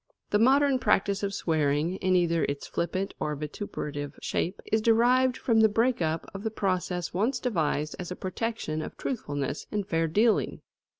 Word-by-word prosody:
The 205 - +3
modern 270 +3 +4
practice 200 -3 +2
of 200 -1 -1
swearing, 160 -1 0
in 185 -1 +1
either 170 -2 +2
its 140 0 -4
flippant 185 +3 -2
or 150 0 -1
vituperative 145 -2 -5
shape, 185 +4 -2
is 220 - +3
derived 245 +3 +4
from 230 -3 +2
the 220 0 +6
break 230 +1 +1
up 160 0 -1
of 195 - -6
the 220 - -1
process 185 -4 -2
once 220 +9 +1
devised 155 - -1
as 180 - -5
a 180 - -4
protection 190 -5 -3
of - - -7
truthfulness 145 - -3
and 205 -2 -2
fair 165 -2 +1
dealing. 215 +8 +2
190 Hz, 170 wpm, -28 LUFS, 160-225 Hz, -, the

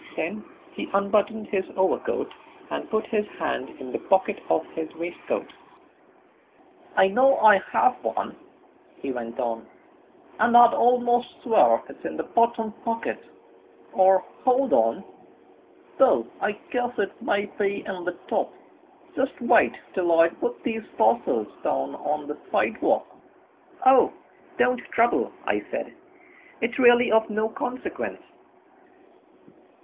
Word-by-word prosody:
Then 190 +7 -4 0.3
he - - -6
unbuttoned 210 +2 +1
his 195 -2 0
overcoat 430 - 0 0.4
and - - -4
put 220 0 -1
his 210 -2 -1
hand 155 -5 -3
in 130 -2 -8
the - - -3
pocket 190 +2 +1
of 160 - +1
his 160 -1 -5
waistcoat. 175 - -4 1.5
"I 190 - +6
know 260 +7 +4
I 210 -2 +7
have 385 -2 +2
one," - - -3 0.6
he 135 - -4
went 120 -1 -6
on, 115 -2 -3 0.7
"and 240 +1 +5
I'd 240 -1 +8
almost 245 0 +1
swear - - +4
it's - - -14
in - - -5
the - - -2
bottom 230 -1 +1
pocket 230 0 -3 0.7
or, 190 0 +4 0.2
hold 260 +1 +2
on, 115 0 +2 1.0
though, 115 - +5 0.2
I 210 - 0 0.2
guess 245 0 -2
it 200 -2 -3
may 205 0 0
be 200 -1 -3
in 185 -2 -6
the 180 0 -4
top - - -1 0.6
just - - -2
wait - - +3 0.2
till 175 -3 +2
I 165 0 +6
put 240 +7 -5
these 225 -3 -2 0.2
parcels - - +2 0.2
down 65 +1 -1
on 150 0 -3
the 150 - -6
sidewalk." - - +1 0.8
"Oh, 260 0 +6 0.5
don't 250 0 +2
trouble," 235 +1 +1
I - - -1
said, - - -5 0.7
"it's 240 +3 -2
really 240 -2 +6
of 220 0 +3
no 215 +1 -1
consequence." 250 +3 -5
210 Hz, 130 wpm, -25 LUFS, 175-240 Hz, 1.5 s, I'd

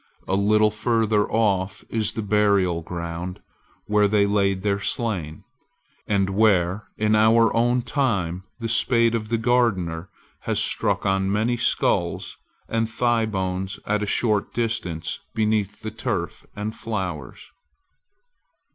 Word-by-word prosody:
A - - -1
little 105 +2 +3
further 110 -1 +1
off 100 -4 0
is 110 -2 0
the 110 - -3
burial 100 -4 +2
ground 85 +2 -5 0.5
where 105 0 +3
they 100 0 +3
laid 100 -2 +1
their 100 -1 +1
slain, 95 -7 -2 0.6
and 95 -2 +1
where 95 -2 +2
even 105 0 +1
in - - +5
our 110 +1 +4
own 120 +1 +2
time 95 - -1
the 115 -2 -4
spade 115 +1 +3
of 110 -2 -2
the 115 - +1
gardener 100 -8 0 0.3
has - - -2
struck - - +1
upon 95 -1 0
many 110 +4 +1
sculls 115 - 0 0.3
and 115 0 -1
thighbones 100 -5 -1
at 105 0 0
a 105 - -2
short 105 -2 0
distance 100 -9 -2 0.2
beneath 105 -2 0
the 110 - -5
turf 105 -5 -4
and 105 +2 -4
flowers. 90 - -5
105 Hz, 130 wpm, -23 LUFS, 95-115 Hz, 0.6 s, in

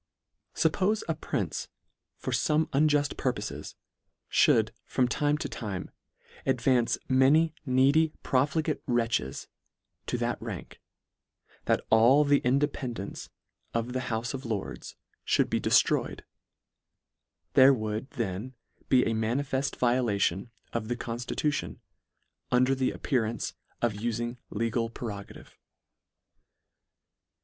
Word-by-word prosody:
Suppole 205 +3 +2
a 165 - +1
prince 155 - -3 0.5
for - - -4
fome 155 +1 +2
unjuft 145 0 +2
purpofes, 120 -5 -3 0.6
Ihould 110 -1 +4
from 125 -2 +1
time 145 +4 +1
to - - -3
time 100 -6 -5 0.5
advance 125 -2 +2
many 145 +5 +4
needy 140 +5 +4
profligate 150 +4 +1
wretches, 115 - 0 0.6
to - - -1
that - - -2
rank, - - -7 0.8
that - - +1
all 120 +6 +6
the 145 -1 +4
independance 130 -5 -2 0.5
of 115 +2 -1
the 130 - 0
houfe 115 +1 -2
of 135 0 -5
Lords 110 -5 -5 0.4
mould - - +2
be - - +1
deltroyed, - - +2 1.3
there 130 +1 +8
would 110 0 -2
then 115 -1 -4 0.3
be 125 -2 +5
a 115 - 0
manifeft 130 +5 -1
violation 115 -5 +1 0.2
of 115 -2 -2
the 120 - -1
conftituti 120 +6 -2
on, - - -9 0.7
under 130 +2 +4
the 130 -1 +1
appearance 115 -5 -1 0.3
of 120 -3 +2
uiing 120 +3 -3
legal 115 +1 -1
pre 115 0 -6
rogative. 100 -1 -9
125 Hz, 110 wpm, -28 LUFS, 115-140 Hz, 1.3 s, there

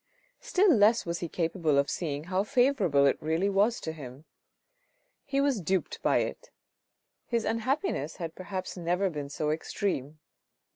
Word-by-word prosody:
Still 415 -6 +3
less 220 0 +4
was 170 -1 -2
he 170 - -4
capable 165 -3 0
of 140 0 +3
seeing 150 -4 -3
how 185 +3 0
favourable 230 - +3
it 140 - +2
really 165 +6 0
was 205 +4 +2
to 160 - -3
him. 140 -2 -10 1.0
He 275 -1 -1
was 275 -7 +1
duped 185 +2 -1
by - - +3
it. - - -5 0.8
His 235 -2 0
unhappiness 230 - -1
had 165 -2 -5
perhaps 185 0 -5
never 180 +2 0
been 145 -3 -5
so 150 +1 -1
extreme. 155 -2 -2
180 Hz, 150 wpm, -29 LUFS, 155-225 Hz, 1.0 s, less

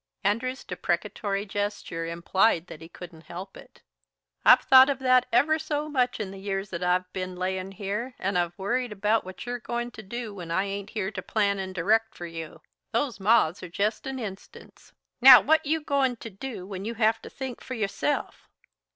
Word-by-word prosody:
Andrew's 240 +6 -1
deprecatory 195 +3 -2
gesture 205 -5 -3
implied 170 +2 +1
that 160 -3 -11
he 165 - -11
couldn't 170 -2 -12
help 185 +3 -8
it. - - -16 0.6
"I've - - +8
thought 260 +1 +7
of 280 - 0
that 255 -1 +3
ever 295 +7 +3
so 300 -1 -2
much 250 -4 0
in 200 -3 -4
the 195 - -9
years 195 0 -3
that 170 -1 -4
I've 180 +1 0
ben 185 -1 -4
layin' 185 +1 -3
here, 210 +6 -4
and 195 0 -2
I've 175 -1 0
worried 240 +5 -1
about 210 +2 +1
what 185 +3 -9
you're 245 0 -3
goin' 240 0 -4
to 220 - -10
do 225 +1 -6
when 180 -4 -8
I 185 +3 +1
ain't 200 0 -5
here 205 -3 -3
to - - -5
plan 200 -2 0
and 190 -1 -5
direct 220 +6 +1
for 175 - -7
you. 165 -2 -8 0.3
Those 250 -8 -1
moths 200 -4 +3
are 180 - -7
jest 210 +7 -1
an 270 0 -4
instance. 205 -5 -9 0.3
Now, 260 0 +11
what 315 0 +2
you 320 +2 +1
goin' 275 -4 +1
to 230 -1 -9
do 200 -1 -7
when 190 -1 -6
you 230 +3 -4
have 220 -1 +2
to - - -9
think 260 -3 -7
for 255 - -6
yourself?" 210 +6 -2
205 Hz, 195 wpm, -27 LUFS, 185-245 Hz, 0.6 s, Now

